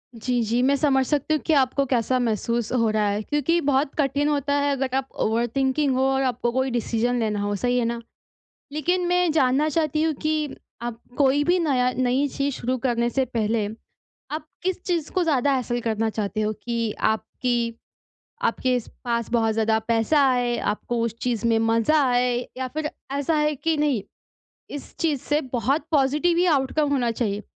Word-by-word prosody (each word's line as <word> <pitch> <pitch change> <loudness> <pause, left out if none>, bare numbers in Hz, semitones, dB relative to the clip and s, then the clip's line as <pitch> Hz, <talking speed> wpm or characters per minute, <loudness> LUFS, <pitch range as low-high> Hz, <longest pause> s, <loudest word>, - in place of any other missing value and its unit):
जी, 245 +1 -1
जी, 235 +3 +1
मैं 275 +2 +4
समझ 270 -2 +2
सकती 295 +2 0
हूँ 305 - 0
कि 320 - +2
आपको 275 0 +3
कैसा 250 0 +1
महसूस 235 0 -1
हो 230 -3 +2
रहा 215 -1 +1
है, 205 +1 -1
क्योंकि 295 +5 +1
बहुत 275 0 +1
कठिन 285 0 +1
होता 285 -1 0
है 285 0 +1
अगर 265 -1 -1
आप 270 0 -2 0.2
ओवर 230 +2 +1
थिंकिंग 270 +1 +1
हो 260 - +2
और 270 0 +1
आपको 240 -1 0
कोई 260 +1 0
डिसीज़न 240 +1 0
लेना 210 -2 -1
हो, 205 0 -1
सही 245 +5 0
है - - +1
ना? 235 0 -2 0.7
लेकिन 350 +5 0
मैं 355 -2 +2
जानना 290 0 +2
चाहती 310 0 0
हूँ 320 -1 +1
कि, 305 0 -2 0.3
आप 235 -1 -5 0.2
कोई 285 +1 +3
भी 355 +4 +3
नया 260 -6 +2
नई 255 +3 +2
चीज़ 280 +1 -2
शुरू 255 +2 -2
करने 240 -1 0
से 265 +1 0
पहले, 225 -3 0 0.7
आप 310 0 -4 0.2
किस 370 0 -2
चीज़ 340 -4 -1
को 370 - +1
ज़्यादा 285 -3 +2
हैसल 240 -1 -1
करना 225 -1 0
चाहते 215 0 -3
हो 215 0 0
कि 230 -2 -1
आपकी 230 +2 -1 0.7
आपके 255 -1 +1 0.3
पास 235 -2 -1
बहुत 225 -2 +2
ज़्यादा 220 0 +2
पैसा 230 +6 +3
आए, 245 -2 +1
आपको 230 +3 -2
उस 230 -1 -2
चीज़ 235 -2 -1
में 225 -1 +3
मज़ा 230 +7 +3
आए, 245 0 +2 0.2
या 260 0 -3
फिर 300 +3 -3 0.2
ऐसा 285 +3 0
है 300 0 +1
कि 320 +3 -1
नहीं, 290 -8 +1 0.7
इस 290 - -8
चीज़ 300 -6 0
से 295 +1 +1
बहुत 275 +5 0
पॉजिटिव 300 +4 +2
ही 360 - +4
आउटकम 290 -1 +1
होना 245 -4 +1
चाहिए, 210 -3 -2
255 Hz, 185 wpm, -24 LUFS, 235-290 Hz, 0.7 s, मैं